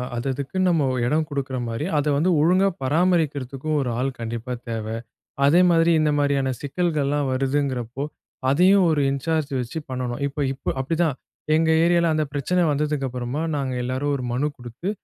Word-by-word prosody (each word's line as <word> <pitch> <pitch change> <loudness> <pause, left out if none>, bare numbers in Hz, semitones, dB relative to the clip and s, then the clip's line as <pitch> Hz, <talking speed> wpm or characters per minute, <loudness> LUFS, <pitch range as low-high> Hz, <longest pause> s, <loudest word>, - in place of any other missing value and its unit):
அது 120 +3 -3
அதுக்குன்னு 145 +8 -1
நம்ம 165 -4 +2 0.2
எடம் 155 +5 +1
கொடுக்குற 135 -3 -3
மாரி, 115 +6 -3
அத 145 - +1
வந்து 165 +6 +2
ஒழுங்கா 185 +5 +4 0.2
பராமரிக்கிறதுக்கு 145 -3 0
ஒரு 135 -3 -1
ஆள் 130 +2 +1
கண்டிப்பா 115 +2 -5 0.2
தேவ. 110 -2 -3 0.6
அதேமாரி, 170 +2 +5
இந்த 155 -1 +2
மாரியான 140 -2 +1
சிக்கல்கள்லாம் 145 -2 0
வருதுங்கிறப்போ 130 -2 -1 0.5
அதையும் 185 +7 +5
ஒரு 150 -2 +2
இன்சார்ஜ் 155 +2 -1
வச்சு 125 +6 -4
பண்ணணும். 125 0 -3
இப்போ 145 +1 -5
இப்போ 135 - -5
அப்டிதான் 160 +1 0 0.4
எங்க 160 0 +2
ஏரியால, 170 -1 +3
அந்த 155 0 +1
பிரச்சனை 180 +6 0
வந்ததுக்கு 150 -1 -1
அப்புறமா 125 +4 -3
நாங்க 135 -2 -2
எல்லோரும் 130 +3 -1
ஒரு 130 - -4
மனு 135 +5 +1
குடுத்து 120 - -6
145 Hz, 150 wpm, -23 LUFS, 130-160 Hz, 0.6 s, அதேமாரி